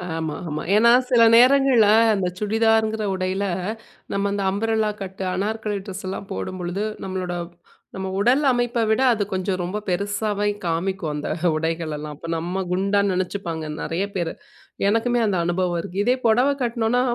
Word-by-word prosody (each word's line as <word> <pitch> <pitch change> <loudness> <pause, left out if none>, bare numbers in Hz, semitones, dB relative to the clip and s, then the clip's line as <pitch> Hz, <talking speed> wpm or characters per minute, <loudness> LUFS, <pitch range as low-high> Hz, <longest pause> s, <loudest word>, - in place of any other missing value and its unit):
ஆமா, 160 -2 -3
ஆமா. 150 +1 -3
ஏன்னா, 235 +2 +6 0.2
சில 235 -2 +6
நேரங்கள்ல 255 -3 +6 0.3
அந்த 185 -2 -1
சுடிதார்ங்கிற 220 0 +2
உடையில 185 +2 -1 0.7
நம்ம 200 0 0
அந்த 200 -1 -1
அம்ப்ரெல்லா 220 +1 0
கட்டு, 190 0 -7
அனார்கலி 210 +1 -2
ட்ரெஸ்ஸல்லாம் 190 0 -6
போடும்பொழுது, 180 - -4 0.2
நம்மளோட 185 -2 -3 0.6
நம்ம 190 0 -4
உடல் 250 +7 +3
அமைப்ப 240 -1 0
விட 220 +4 +2
அது 215 -3 +1
கொஞ்சம் 185 0 -1
ரொம்ப 180 +4 -3
பெருசாவே 205 +2 -1 0.2
காமிக்கும் 170 0 -1
அந்த 150 0 -4 0.3
உடைகளெல்லாம். 155 -2 -3
அப்ப 165 - -10
நம்ம 180 +3 -3
குண்டா 195 +2 +1
நெனச்சுப்பாங்க 180 -3 -3 0.2
நெறைய 180 +5 -1
பேரு. 170 -3 -1 0.6
எனக்குமே 235 +3 +2
அந்த 195 -3 +1
அனுபவம் 175 0 0
இருக்கு. 180 +3 -8
இதே 250 +3 +3
பொடவை 250 +5 +4
கட்டினோம்ன்னா, 235 0 +1
200 Hz, 140 wpm, -22 LUFS, 180-220 Hz, 0.7 s, ஏன்னா